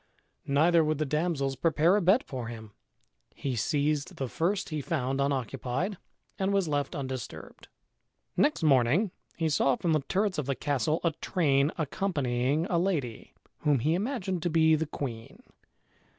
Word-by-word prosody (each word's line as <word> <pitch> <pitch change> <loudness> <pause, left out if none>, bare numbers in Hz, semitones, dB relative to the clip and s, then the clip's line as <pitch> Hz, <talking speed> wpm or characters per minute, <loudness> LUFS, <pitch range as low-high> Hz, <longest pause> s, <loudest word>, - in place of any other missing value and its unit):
Neither 160 +4 +4
would 155 -1 0
the 155 - 0
damsels 150 -2 -1
prepare 165 +4 +3
a 210 - +2
bed 190 +8 +4
for 125 -3 -6
him. 110 -2 -8 0.6
He 135 -3 -3
seized 145 +5 0
the 135 - -3
first 185 - -1
he 155 -2 -3
found 135 -3 -1
unoccupied 135 - -1 0.4
and 195 0 +1
was 195 -3 +1
left 145 -2 -1
undisturbed. 130 -2 -6 0.7
Next 295 - +2
morning 150 - +3 0.3
he 165 - 0
saw 140 -3 +2
from 165 +5 0
the 155 - +3
turrets 190 +5 -1
of 140 - -3
the 140 - 0
castle 145 +4 0
a 170 - +2
train 145 -4 +2
accompanying 145 -4 0
a 180 -4 +1
lady, 150 - -2 0.2
whom 150 -2 +2
he 150 +7 +1
imagined 190 -3 -2
to 175 - 0
be 160 -1 +4
the 155 0 +1
queen. 120 -6 -6
150 Hz, 155 wpm, -29 LUFS, 135-175 Hz, 0.7 s, Neither